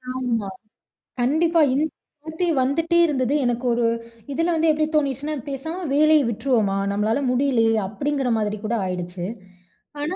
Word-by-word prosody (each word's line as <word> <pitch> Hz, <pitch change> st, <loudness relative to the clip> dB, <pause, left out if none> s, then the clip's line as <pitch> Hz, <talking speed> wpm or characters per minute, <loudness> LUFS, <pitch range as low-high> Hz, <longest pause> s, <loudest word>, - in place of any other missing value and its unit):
ஆமா, 235 Hz, -5 st, -1 dB, 0.7 s
கண்டிப்பா 325 Hz, +6 st, +2 dB
இந் 295 Hz, +3 st, +2 dB, 0.4 s
வார்த்தை 325 Hz, +3 st, -2 dB
வந்துட்டே 330 Hz, +6 st, +1 dB
இருந்தது. 270 Hz, -2 st, 0 dB
எனக்கு 245 Hz, +1 st, -1 dB
ஒரு 235 Hz, 0 st, +1 dB, 0.5 s
இதுனால 330 Hz, +4 st, 0 dB
வந்து 320 Hz, 0 st, +3 dB
எப்படித் 310 Hz, +1 st, -1 dB
தோணிர்ச்சுன்னா 290 Hz, +1 st, 0 dB
"பேசாம 320 Hz, +7 st, -5 dB
வேலைய 305 Hz, +1 st, +5 dB
விட்ருவோமா, 220 Hz, -4 st, 0 dB, 0.2 s
நம்மளால 215 Hz, +4 st, 0 dB
முடியலையே" 250 Hz, -3 st, +2 dB
அப்படிங்கற 270 Hz, +5 st, -2 dB
மாதிரி 210 Hz, 0 st, -1 dB
கூட 220 Hz, +2 st, -1 dB
ஆயிடுச்சு. 180 Hz, -1 st, -4 dB, 0.8 s
ஆனா 325 Hz, +5 st, -2 dB
270 Hz, 130 wpm, -22 LUFS, 230-310 Hz, 0.8 s, வேலைய